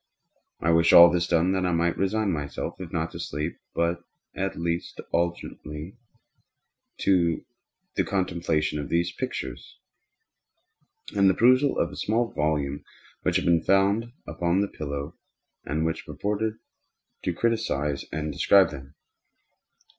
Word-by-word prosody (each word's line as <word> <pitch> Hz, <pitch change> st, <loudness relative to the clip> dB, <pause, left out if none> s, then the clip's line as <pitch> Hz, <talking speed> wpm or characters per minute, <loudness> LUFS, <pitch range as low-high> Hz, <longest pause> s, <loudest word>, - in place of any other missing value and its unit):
I 80 Hz, -, +2 dB
wished 85 Hz, 0 st, +4 dB
all 85 Hz, 0 st, +10 dB
this 85 Hz, 0 st, 0 dB
done 85 Hz, +2 st, +2 dB
that 95 Hz, -1 st, 0 dB
I 90 Hz, -, +1 dB
might 85 Hz, 0 st, +1 dB
resign 100 Hz, +1 st, 0 dB
myself, 75 Hz, -4 st, -4 dB
if 85 Hz, -3 st, -7 dB
not 80 Hz, -1 st, -2 dB
to -, -, -8 dB
sleep, 75 Hz, +4 st, -4 dB, 0.8 s
at 95 Hz, 0 st, -2 dB
least 85 Hz, 0 st, -3 dB
alternately 85 Hz, -1 st, -3 dB, 1.1 s
to 85 Hz, -4 st, +2 dB, 0.5 s
the -, -, +2 dB
contemplation 85 Hz, -5 st, -1 dB
of 70 Hz, -, -5 dB
these 85 Hz, +1 st, +1 dB
pictures, -, -, -6 dB, 1.4 s
and 100 Hz, -1 st, +5 dB
the 95 Hz, -, +2 dB
perusal 130 Hz, +5 st, +4 dB
of -, -, 0 dB
a -, -, -9 dB
small 115 Hz, +2 st, 0 dB
volume 75 Hz, -2 st, -1 dB, 0.4 s
which -, -, 0 dB
had -, -, +1 dB
been 85 Hz, -1 st, +4 dB
found 100 Hz, +6 st, +2 dB
upon 85 Hz, +2 st, 0 dB
the 100 Hz, -, 0 dB
pillow, 70 Hz, +1 st, -6 dB, 0.5 s
and 80 Hz, +3 st, -1 dB
which 80 Hz, 0 st, -3 dB
purported 105 Hz, +8 st, -2 dB, 0.7 s
to -, -, 0 dB
criticise 85 Hz, -9 st, -1 dB
and 75 Hz, -1 st, -3 dB
describe 100 Hz, +6 st, +5 dB
them. 70 Hz, +1 st, -10 dB
85 Hz, 135 wpm, -26 LUFS, 75-95 Hz, 1.4 s, all